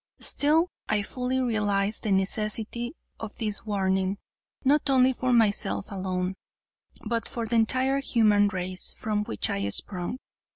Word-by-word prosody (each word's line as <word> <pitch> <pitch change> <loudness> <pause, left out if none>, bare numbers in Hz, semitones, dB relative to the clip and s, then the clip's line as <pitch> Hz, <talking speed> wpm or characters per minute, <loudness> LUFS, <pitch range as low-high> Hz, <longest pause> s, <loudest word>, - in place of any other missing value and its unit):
Still 320 +4 +3 0.2
I 210 -1 +2
fully 255 +3 -2
realized 210 -4 0
the 215 - -2
necessity 215 - -1 0.2
of 220 -1 -7
this 215 -2 -3
warning; 190 -1 0 0.5
not 285 +2 +3
only 260 -1 +5
for 255 0 -1
myself 200 - +1
alone, 185 -1 -2 0.7
but 230 +1 -1
for 235 -1 -3
the 230 +1 0
entire 260 +4 +2
human 215 -6 +3
race 185 -2 -3
from 210 -1 -1
which 105 - 0
I 100 0 -1
sprung. 180 - -2
215 Hz, 135 wpm, -27 LUFS, 195-245 Hz, 0.7 s, only